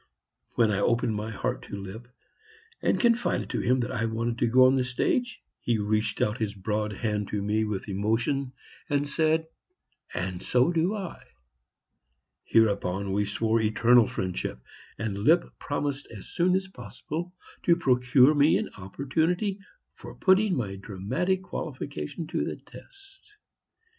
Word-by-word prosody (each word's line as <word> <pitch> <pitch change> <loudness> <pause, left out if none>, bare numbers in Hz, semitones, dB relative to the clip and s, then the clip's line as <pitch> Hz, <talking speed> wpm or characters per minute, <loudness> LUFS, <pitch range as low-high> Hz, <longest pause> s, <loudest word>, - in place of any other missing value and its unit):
When 115 -2 +3
I 100 - 0
opened 115 +1 +1
my 105 +1 -3
heart 110 - -3
to - - -6
Lipp 100 +5 -8 0.7
and - - +1
confided 235 0 +1
to - - -1
him 125 +1 +2
that 120 - -3
I 115 -3 -1
wanted 115 +1 -2
to 120 - +2
go 130 +2 +6
on 130 - +5
the 130 -1 +2
stage, 235 - -1 0.2
he 120 -2 0
reached 105 0 0
out 105 +3 -1
his 105 -2 -2
broad 105 +2 -2
hand 105 -1 -2
to 105 - -2
me 110 +2 +1
with 105 -2 -4
emotion 115 +7 0 0.4
and 145 0 +1
said, 160 +2 +1 0.7
"And 90 -1 -3
so 125 +6 +2
do 175 +5 +1
I." 195 -4 -6 1.2
Hereupon 100 -3 +2
we 105 +1 +1
swore 110 +2 +1
eternal 115 +1 +4
friendship, 90 -9 -3 0.4
and 105 -3 -3
Lipp 165 +11 +2
promised 145 -1 -3
as 105 -4 -10
soon 180 +1 +2
as 190 0 -1
possible 165 - -7 0.3
to 170 - +6
procure 125 -2 +4
me 145 +1 +4
an - - -4
opportunity 160 - -1 0.3
for - - -11
putting 190 0 +3
my 100 -6 -3
dramatic 105 - -2
qualifications 150 - -5
to - - 0
the - - -3
test. 395 +1 -17
120 Hz, 150 wpm, -27 LUFS, 105-160 Hz, 1.2 s, go